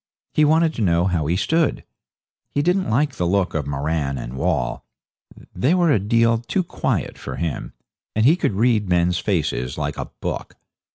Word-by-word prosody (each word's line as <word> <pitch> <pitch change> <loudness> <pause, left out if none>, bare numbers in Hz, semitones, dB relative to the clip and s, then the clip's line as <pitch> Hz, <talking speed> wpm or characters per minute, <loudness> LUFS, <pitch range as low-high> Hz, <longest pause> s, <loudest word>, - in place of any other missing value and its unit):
He 155 - +4
wanted 160 +1 +3
to 115 - -4
know 85 -3 +2
how 85 -5 0
he 85 - +1
stood. 160 - +1 0.7
He 145 - -1
didn't 180 -2 +1
like 140 +6 +2
the 90 - 0
look 95 0 +1
of 75 -3 -2
Moran 70 0 -1
and - - -6
Wall 60 -2 -1 0.7
they 130 - +2
were 175 -3 +3
a 130 - +4
deal 115 +3 +2
too 150 +11 -1
quiet - - -2
for - - -6
him, 80 0 -4 0.4
and 110 +1 +2
he 155 +6 +6
could 175 - -1
read 110 -1 +2
men's 90 0 +2
faces 75 - -1
like - - -3
a - - -3
book. - - -6
100 Hz, 180 wpm, -22 LUFS, -, 0.7 s, he